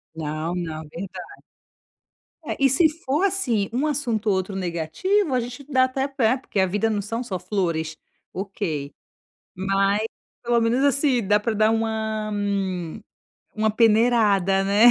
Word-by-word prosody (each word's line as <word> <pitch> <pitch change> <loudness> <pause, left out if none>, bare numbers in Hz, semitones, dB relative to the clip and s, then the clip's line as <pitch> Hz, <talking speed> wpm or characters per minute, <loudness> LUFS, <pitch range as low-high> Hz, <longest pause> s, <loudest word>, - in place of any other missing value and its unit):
Não, 155 +2 -3
não. 160 -3 -4
Verda 185 +3 -7 1.2
É. - - -3
E 275 -1 +4
se 315 +5 +5
for 305 +1 -1
assim, 250 - 0
um 260 +6 0
assunto 250 -8 -1
ou 200 - +4
outro 190 +1 -3
negativo, 195 - 0
a 250 - +2
gente 250 +4 -7
dá 260 -2 +4
até 265 +1 -1
pé, 260 -4 +1
porque 250 -6 -3
a 190 - +4
vida 205 +4 0
não 205 -2 -1
são 230 +4 -3
só 195 -7 -4
flores. 165 -6 -2 0.4
OK. 180 -7 -4 0.6
Mas 195 +2 +1 0.4
pelo 240 0 +2
menos, 235 +4 +2
assim. 280 -4 +2
Dá 205 +2 +4
pra 225 +2 -1
dar 215 +1 +3
uma 220 -1 -1
m 195 -3 -2 0.6
uma 215 0 +2
peneirada, 215 -4 +3
né. 205 +4 +6
215 Hz, 155 wpm, -23 LUFS, 190-250 Hz, 1.2 s, né